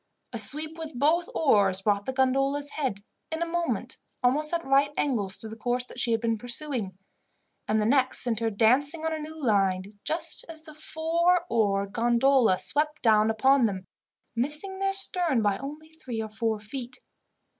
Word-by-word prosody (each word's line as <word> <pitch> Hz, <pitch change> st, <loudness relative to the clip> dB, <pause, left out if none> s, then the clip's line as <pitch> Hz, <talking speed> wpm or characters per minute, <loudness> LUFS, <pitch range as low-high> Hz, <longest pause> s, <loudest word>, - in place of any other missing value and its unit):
A 230 Hz, -, +1 dB
sweep 310 Hz, +7 st, +3 dB
with 315 Hz, -5 st, -7 dB
both 325 Hz, +6 st, +2 dB
oars 200 Hz, -, +3 dB
brought 205 Hz, -1 st, 0 dB
the -, -, 0 dB
gondola's 275 Hz, +2 st, 0 dB
head, 255 Hz, -10 st, -3 dB, 0.3 s
in 320 Hz, +1 st, -1 dB
a -, -, -1 dB
moment, 340 Hz, 0 st, -3 dB, 0.2 s
almost 295 Hz, +5 st, +2 dB
at 340 Hz, -1 st, -2 dB
right 275 Hz, +1 st, +3 dB
angles 210 Hz, -9 st, 0 dB
to 220 Hz, -, -8 dB
the 220 Hz, -, -8 dB
course 245 Hz, +2 st, -1 dB
that 250 Hz, -, -10 dB
she 240 Hz, -1 st, +1 dB
had 225 Hz, -, +2 dB
been 230 Hz, -1 st, -1 dB
pursuing; 245 Hz, -6 st, -3 dB, 0.7 s
and 215 Hz, +1 st, +1 dB
the 210 Hz, -, +1 dB
next 260 Hz, +2 st, +3 dB
sent 235 Hz, -4 st, -1 dB
her 225 Hz, -1 st, 0 dB
dancing 270 Hz, +9 st, +2 dB
on 320 Hz, -, 0 dB
a 315 Hz, -, -3 dB
new 315 Hz, +1 st, -8 dB
line, 195 Hz, -1 st, 0 dB
just 325 Hz, +1 st, -1 dB
as 320 Hz, 0 st, -9 dB
a 310 Hz, -, -10 dB
four 335 Hz, +3 st, 0 dB
oared 200 Hz, -3 st, +1 dB
gondola 240 Hz, -2 st, +3 dB
swept 300 Hz, +6 st, -1 dB
down 215 Hz, -2 st, +4 dB
upon 260 Hz, +4 st, +3 dB
them, 190 Hz, -3 st, -3 dB, 0.5 s
missing 300 Hz, +10 st, -2 dB
their 390 Hz, 0 st, +1 dB
stern 355 Hz, -, +1 dB
by 205 Hz, -1 st, +1 dB
only 300 Hz, +3 st, -8 dB
three 260 Hz, -8 st, -7 dB
or 220 Hz, 0 st, -4 dB
four 220 Hz, 0 st, -2 dB
feet. 245 Hz, +4 st, -8 dB
260 Hz, 180 wpm, -27 LUFS, 220-310 Hz, 0.7 s, down